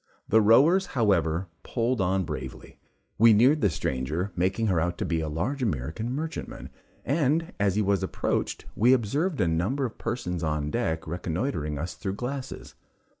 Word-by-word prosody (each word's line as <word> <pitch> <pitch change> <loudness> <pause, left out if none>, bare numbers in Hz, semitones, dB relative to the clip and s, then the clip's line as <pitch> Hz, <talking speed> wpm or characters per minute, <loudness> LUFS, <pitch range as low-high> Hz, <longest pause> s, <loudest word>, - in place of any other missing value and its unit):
The 110 - +5
rowers, 150 - +5
however, 95 -5 +2
pulled 120 -1 -1
on 95 +1 +1
bravely 65 -5 -7 0.4
we 115 0 +7
neared 130 +8 +4
the - - +4
stranger, 80 +6 -2
making 95 +5 0
her 95 -6 +2
out 85 +2 -1
to - - -2
be 80 -1 0
a 80 - -3
large 105 - -2
American 95 - -2
merchantman, 155 +5 -5 0.3
and 155 +3 +1
as 100 -2 +2
he 105 - +2
was 100 -1 +1
approached, - - -2
we 120 +4 +5
observed 140 - 0
a 90 - +2
number 95 +13 0
of 115 - -7
persons 90 -8 -3
on 75 -2 -1
deck 80 -9 -1
reconnoitring 85 - -3
us 85 +5 -4
through 95 -1 -4
glasses. 130 +4 -6
100 Hz, 165 wpm, -27 LUFS, 85-125 Hz, 0.4 s, we